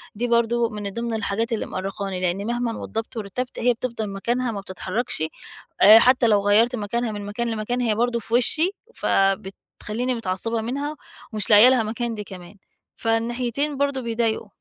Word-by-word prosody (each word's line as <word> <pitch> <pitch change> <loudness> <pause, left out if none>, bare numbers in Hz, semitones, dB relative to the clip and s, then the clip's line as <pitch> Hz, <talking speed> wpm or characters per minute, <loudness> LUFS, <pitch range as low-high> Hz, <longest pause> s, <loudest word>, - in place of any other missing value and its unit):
دي 240 +3 -1
برضو 235 0 +2
من 205 -2 -5
ضمن 235 0 -3
الحاجات 220 +2 -1
اللي 220 - -2
مؤرقاني، 195 0 -4
لأن 185 +3 -1
مهمًا 240 -1 -1
وضبت 225 +2 -5
ورتبت 225 +5 -4
هي 245 +1 +3
بتفضل 230 -3 -4
مكانها 235 +5 -1
ما 200 -2 -5
بتتحركش، 190 0 -3 0.6
آآ 215 +3 +10
حتى 250 -1 +4
لو 210 -2 +4
غيرت 220 +5 +3
مكانها 225 +2 -2
من 205 -1 -6
مكان 235 +4 -3
لمكان 225 +3 -2
هي 220 -3 +1
برضه 235 +1 +1
في 225 +1 -8
وشي، 315 +9 +3 0.2
فبتخلّيني 210 +5 -1
متعصبة 225 +2 -2
منها 280 +6 -3 0.4
ومش 210 -1 -1
لاقية 215 +4 +8
لها 250 -4 +3
مكان 230 +2 -3
دي 210 - -5
كمان. 185 0 -11 0.4
فالناحيتين 240 +5 -1
برضه 280 -2 0
بيضايقوا. 225 -2 -1
225 Hz, 165 wpm, -23 LUFS, 205-240 Hz, 0.6 s, آآ